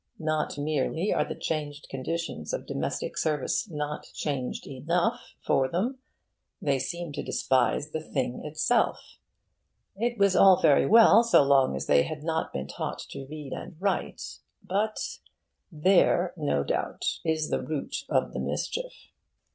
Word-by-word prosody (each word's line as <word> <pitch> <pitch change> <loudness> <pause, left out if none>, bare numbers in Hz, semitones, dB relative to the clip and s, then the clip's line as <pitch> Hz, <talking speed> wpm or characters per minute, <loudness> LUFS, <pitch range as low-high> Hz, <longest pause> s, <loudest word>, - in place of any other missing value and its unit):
Not 155 -1 -1
merely 155 +5 0
are 150 - +2
the - - -6
changed 150 -2 -4
conditions 165 - -4
of - - -3
domestic - - -3
service 155 - 0
not 150 -2 -4
changed 135 -4 -3
enough 170 - -1
for 130 - +3
them: 225 - -2 0.6
they 140 -2 +1
seem 170 +4 -4
to 145 - -3
despise 135 +3 +1
the 160 - -3
thing 130 -5 -3
itself. 155 +10 0 0.8
It 235 +3 -1
was 200 -2 +3
all 190 -2 +7
very 150 -4 +4
well 225 0 +8
so 230 -10 +5
long 135 - +4
as 65 - -3
they 70 - +5
had 150 - -4
not 160 0 -1
been 65 - -4
taught - - -4
to 135 - -7
read 150 -3 -7
and - - -7
write, 195 +1 -2 0.2
but 210 +3 -2 0.5
There, 175 +2 +3
no 145 - 0
doubt, - - -2
is 160 -1 0
the - - +1
root 155 -2 -3
of - - +1
the - - -3
mischief. - - -4
155 Hz, 145 wpm, -27 LUFS, 140-185 Hz, 0.8 s, well